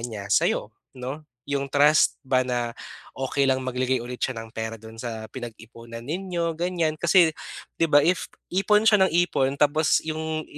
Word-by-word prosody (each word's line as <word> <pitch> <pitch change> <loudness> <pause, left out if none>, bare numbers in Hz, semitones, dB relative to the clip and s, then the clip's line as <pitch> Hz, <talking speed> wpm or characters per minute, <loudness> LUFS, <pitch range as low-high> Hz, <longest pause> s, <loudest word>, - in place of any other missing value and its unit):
niya 110 -4 -6
sayo - - +1 0.2
'no. 130 +5 -6 0.3
Yung 140 -1 -1
trust 145 +1 +4
ba 130 -1 +3
na 120 -2 -2 0.4
okey 135 +1 0
lang 130 0 +1
maglagay 130 -1 -1
ulit 125 0 -7
siya 130 - -1
ng 115 0 -8
pera 110 0 -4
dun 110 +1 -12
sa 115 -2 -5
pinag-iponan 115 -1 -9
ninyo, 170 +2 -2
ganyan. 170 -1 -1
Kasi, 170 -1 +5 0.5
di 165 - +3
ba 145 -1 +5
if 175 +2 +1 0.2
ipon 210 +3 +3
siya 210 -2 +5
ng 190 - 0
ipon 135 -5 0
tapos 150 +1 +2
yung 155 0 -3
135 Hz, 165 wpm, -25 LUFS, 120-160 Hz, 0.5 s, Kasi